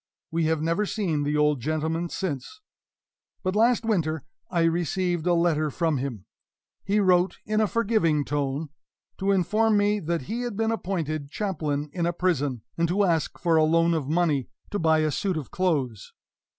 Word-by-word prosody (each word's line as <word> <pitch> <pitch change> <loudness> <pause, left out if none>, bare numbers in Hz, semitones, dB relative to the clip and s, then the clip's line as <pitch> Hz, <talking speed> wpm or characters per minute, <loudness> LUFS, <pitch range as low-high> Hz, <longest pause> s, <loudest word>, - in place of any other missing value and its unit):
We 165 0 +1
have 160 -1 +1
never 170 +6 +1
seen 175 -10 -1
the 145 +1 0
old 150 -2 +3
gentleman 160 +4 -1
since. 170 - -4 0.8
But 185 0 -1
last 230 +1 +3
winter 160 - 0 0.3
I 170 -2 +1
received 175 +1 0
a 175 - +4
letter 160 -3 +2
from 160 +1 0
him; 120 -7 -5 0.6
he 205 +2 +1
wrote 185 -2 +3
in 215 0 +1
a 215 - +3
forgiving 195 -10 +1
tone, 145 +1 -2 0.5
to 195 +1 +1
inform 210 +4 +2
me 205 +1 +2
that 170 -3 -2
he 225 - -3
had 240 -5 -4
been 225 0 +1
appointed 160 -9 -3
chaplain 150 -7 -2
in 170 -2 0
a 175 - 0
prison, 145 -10 0 0.2
and 170 - +3
to 195 +5 +2
ask 165 -5 0
for 170 -2 +2
a 155 - +5
loan 165 +2 +3
of 150 -4 -2
money 155 -5 +1 0.2
to 205 - -1
buy 160 -1 +3
a 155 -1 +1
suit 185 +4 -1
of 150 - -6
clothes. 140 - -1
165 Hz, 175 wpm, -26 LUFS, 150-195 Hz, 0.8 s, a